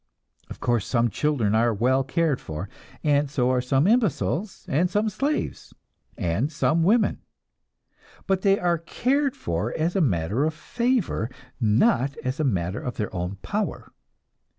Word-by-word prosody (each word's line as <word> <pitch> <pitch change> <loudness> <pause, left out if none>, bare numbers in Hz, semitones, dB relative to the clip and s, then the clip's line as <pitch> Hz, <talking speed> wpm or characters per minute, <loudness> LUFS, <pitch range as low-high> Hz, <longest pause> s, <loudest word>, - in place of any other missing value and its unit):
Of - - -9
course, 120 -4 0
some 120 -2 +1
children 120 -4 +1
are 115 +2 +3
well 130 +5 +2
cared 145 0 0
for, 80 +5 -6 0.4
and 145 -2 +2
so 130 -3 +1
are 125 -1 +2
some 135 +3 +2
imbeciles, 200 - 0
and 170 +6 +1
some 210 +4 +1
slaves, 285 +8 -3 0.4
and 95 - 0
some 160 +1 +1
women. 210 +6 +3 1.1
But 190 -2 +1
they 195 0 +4
are 175 -3 +1
cared 265 - 0
for 85 +7 -2
as 165 +3 0
a 195 - +3
matter 100 - +1
of 155 +1 0
favor, 235 - -1 0.3
not 130 - +2
as 130 +3 -2
a - - +1
matter 95 - -1
of 125 - -5
their 105 -3 -3
own 90 +2 -3
power. 210 0 -3
145 Hz, 150 wpm, -25 LUFS, 115-185 Hz, 1.1 s, they